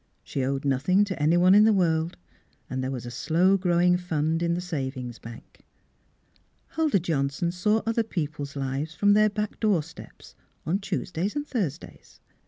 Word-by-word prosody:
She 135 - -3
owed 135 +1 -2
nothing 145 +9 +2
to 190 -6 -4
anyone 175 +4 +5
in 210 +1 +7
the 220 - +5
world, 170 -4 +1 0.5
and 130 +1 -3
there 130 - -2
was 125 -3 -5
a 120 - -6
slow 180 +9 +2
growing 180 -1 +3
fund 165 -2 -1
in 170 0 +1
the - - -2
savings 130 -8 -5
bank. 115 0 -12 1.1
Huldah 310 -11 +1
Johnson 155 +1 -1
saw 210 +5 +1
other 230 0 +1
people's 150 -9 -4
lives 140 +3 -3
from 205 0 +4
their 215 +1 +4
back 210 0 -4
door 205 -8 +2
steps, 165 +2 -14 0.3
on 185 +5 0
Tues 195 -2 -4
days 180 +5 -2
and 290 0 -2
Thursdays. 185 - -5
170 Hz, 170 wpm, -26 LUFS, 145-195 Hz, 1.1 s, in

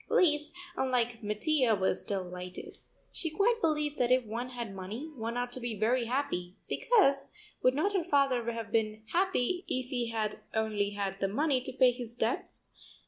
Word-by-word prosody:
Lise, 300 -3 +3 0.2
unlike 245 -5 0
Mattia, 230 +3 +2
was 190 -1 +2
delighted. 180 -2 -5 0.3
She 325 - -2
quite 455 +8 +2
believed 300 -3 0
that 245 0 +2
if 255 -1 +4
one 235 +4 -4
had 235 -5 -5
money 210 +11 -6
one 230 0 -3
ought 245 0 -2
to 255 - -3
be 240 -2 -3
very 235 +3 +2
happy, 210 -9 -2
because, 335 - +3 0.3
would 255 +1 +4
not 390 +8 +1
her 380 -3 +1
father 275 -7 +2
have 230 -2 -6
been 215 -1 0
happy 360 -1 +1
if 255 0 -2
he 245 -3 0
had 215 -2 -1 0.2
only 215 -2 +1
had 195 -1 -3
the 195 - +1
money 270 +5 +1
to 260 - -5
pay 255 -1 +5
his 240 -1 -5
debts? - - -2
245 Hz, 175 wpm, -31 LUFS, 220-285 Hz, 0.3 s, pay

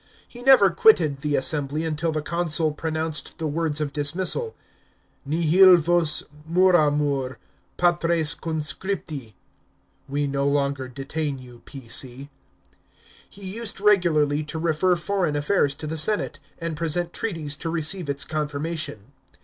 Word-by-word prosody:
He 240 - -12
never 245 -7 +6
quitted 165 -8 +4
the 145 0 -1
assembly 145 +3 +1
until 160 +1 -1
the 155 -1 -3
consul 165 -1 +1
pronounced 160 -1 -3
the 160 - -4
words 155 0 -1
of 145 -2 -3
dismissal 185 - -1 0.4
— - - -40
Nihil 170 +4 +6
vos 170 -1 +2 0.3
moramur, 150 -7 +2 0.4
Patres 170 -3 +1
Conscripti 155 - -4 0.4
(" - - -41
We 145 +1 -1
no 140 0 -1
longer 140 -2 0
detain 140 +3 -4
you, 125 -2 -14
P.C."). 135 +1 -4 1.0
He 200 -1 -13
used 210 +3 -6
regularly 165 -8 +3
to 160 - -6
refer 170 +2 +1
foreign 175 -3 -1
affairs 145 -1 +1
to 155 - -8
the 160 +1 -4
senate, 210 +7 0 0.2
and 165 -2 -4
present 170 +2 -1
treaties 165 -9 -3
to 165 - -4
receive 165 0 -1
its 140 -1 -2
confirmation. 150 -6 -4
155 Hz, 135 wpm, -24 LUFS, 145-175 Hz, 1.0 s, never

